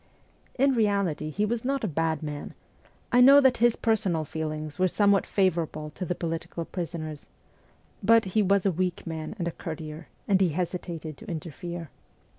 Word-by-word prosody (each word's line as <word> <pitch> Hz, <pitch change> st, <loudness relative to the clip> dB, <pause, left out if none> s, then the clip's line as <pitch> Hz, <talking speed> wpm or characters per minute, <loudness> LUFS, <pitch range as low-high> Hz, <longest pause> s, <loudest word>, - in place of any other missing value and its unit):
In 275 Hz, +1 st, +4 dB
reality, 200 Hz, -9 st, +1 dB
he 205 Hz, +7 st, 0 dB
was 230 Hz, +1 st, -2 dB
not 275 Hz, +1 st, -1 dB
a -, -, +1 dB
bad 160 Hz, -2 st, -1 dB
man 150 Hz, -1 st, -6 dB, 0.6 s
I 245 Hz, -, +5 dB
know 275 Hz, +3 st, +9 dB
that 265 Hz, -3 st, +4 dB
his 240 Hz, 0 st, +4 dB
personal 195 Hz, -8 st, +1 dB
feelings 155 Hz, +1 st, -5 dB
were 185 Hz, -, +4 dB
somewhat 200 Hz, +1 st, +3 dB
favourable 165 Hz, -5 st, 0 dB
to 180 Hz, +4 st, -5 dB
the 180 Hz, -, -1 dB
political 165 Hz, 0 st, -4 dB
prisoners; 160 Hz, -4 st, -5 dB, 0.7 s
but 230 Hz, +2 st, +5 dB
he 215 Hz, -, +4 dB
was 200 Hz, -1 st, +2 dB
a 195 Hz, -, +4 dB
weak 180 Hz, +1 st, -2 dB
man 160 Hz, +3 st, -5 dB
and 175 Hz, -4 st, -2 dB
a -, -, -1 dB
courtier, 155 Hz, 0 st, -7 dB, 0.2 s
and 195 Hz, -2 st, +3 dB
he 185 Hz, -, +4 dB
hesitated 165 Hz, -2 st, -4 dB
to -, -, -13 dB
interfere. 170 Hz, 0 st, -6 dB
175 Hz, 170 wpm, -27 LUFS, 160-205 Hz, 0.7 s, know